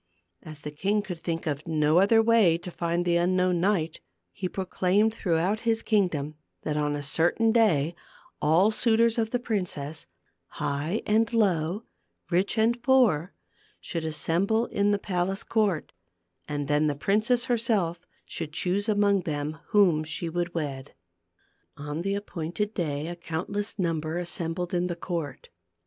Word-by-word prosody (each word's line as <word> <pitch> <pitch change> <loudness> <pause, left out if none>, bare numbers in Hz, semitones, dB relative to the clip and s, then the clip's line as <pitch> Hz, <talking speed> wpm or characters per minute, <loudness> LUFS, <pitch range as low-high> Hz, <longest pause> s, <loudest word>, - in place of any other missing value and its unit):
As 155 -2 -10
the 150 - -6
king 200 +7 0
could 180 -5 -6
think 165 0 -3
of 150 -1 -3
no 155 +1 +3
other 225 +4 +5
way 220 -7 +4
to 175 +1 -8
find 170 +1 -1
the 170 -1 +3
unknown 180 0 +2
knight, 175 -5 0 0.3
he 185 - -4
proclaimed 190 +3 +1
through 180 -7 0
out 190 +6 0
his 230 -1 0
kingdom 170 -9 +1 0.3
that 150 - -2
on 150 -1 0
a 145 - -4
certain 175 +10 +2
day 175 -10 +3 0.5
all 170 +8 +4
suitors 230 +1 +2
of 220 -1 0
the 245 - 0
princess, 180 - -3 0.5
high 150 +9 -2
and 220 +1 +2
low, 195 -3 +1 0.5
rich 185 +5 +1
and 235 +2 +2
poor, 235 - +3 0.5
should 165 -2 -4
assemble 175 +8 0
in 200 -3 0
the 205 - +3
palace 190 0 -2
court, 205 -8 0 0.6
and 145 -1 -3
then 150 +1 +2
the 145 - 0
princess 215 - +1
herself 220 -9 0 0.3
should 155 -3 -6
choose 195 +5 -1
among 205 -2 +3
them 155 -1 -3
whom 185 -8 +4
she 160 +2 -2
would 175 +1 -3
wed. 140 -4 -4 0.8
On 150 +2 -4
the 195 +2 -1
appointed 200 +1 -3
day 150 -6 -2
a 175 +1 -5
countless 180 +6 -4
number 165 -3 -1
as 175 -1 -2
sembled 170 +1 -3
in 180 0 +1
the 175 - -3
court. 165 -6 -5
175 Hz, 155 wpm, -27 LUFS, 160-210 Hz, 0.8 s, other